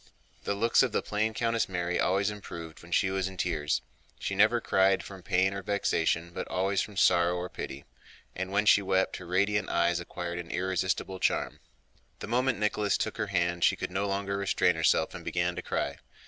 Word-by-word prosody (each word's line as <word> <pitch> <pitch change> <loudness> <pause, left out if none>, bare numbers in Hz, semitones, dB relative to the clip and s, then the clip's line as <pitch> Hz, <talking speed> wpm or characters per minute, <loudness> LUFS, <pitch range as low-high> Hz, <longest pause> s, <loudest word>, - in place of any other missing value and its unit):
The 100 - 0
looks 115 +3 +3
of 125 -5 +1
the - - 0
plain 110 +1 0
Countess 115 -2 0
Mary 90 -1 -1
always 100 +3 +2
improved 85 -6 -9
when 85 - -14
she 95 +2 +2
was 95 -1 -1
in 95 -1 -9
tears. 80 -4 -1 0.3
She - - -3
never 110 +5 +4
cried 95 -3 +2
from 95 -2 -10
pain 95 +1 +1
or 100 - -4
vexation, 85 -4 0
but - - -4
always 95 +3 0
from 105 -3 -6
sorrow 90 -2 +4
or 90 0 -4
pity, 70 +1 -7 0.5
and 95 +1 -4
when 105 +2 +2
she 100 - +6
wept 95 -1 +1
her 90 - -10
radiant 100 +3 +1
eyes 85 0 +2
acquired 85 0 -5
an 85 -1 -7
irresistible 95 +1 -1
charm. - - 0 0.6
The - - -6
moment 125 +2 +1
Nicholas 105 -1 +1
took 110 - -3
her - - -1
hand 85 -2 0
she - - +5
could - - -5
no 100 +2 -1
longer 100 0 -2
restrain 95 -2 +2
herself 80 -1 +2
and - - -8
began 90 0 -1
to - - -4
cry. - - -2
95 Hz, 200 wpm, -29 LUFS, 85-100 Hz, 0.6 s, she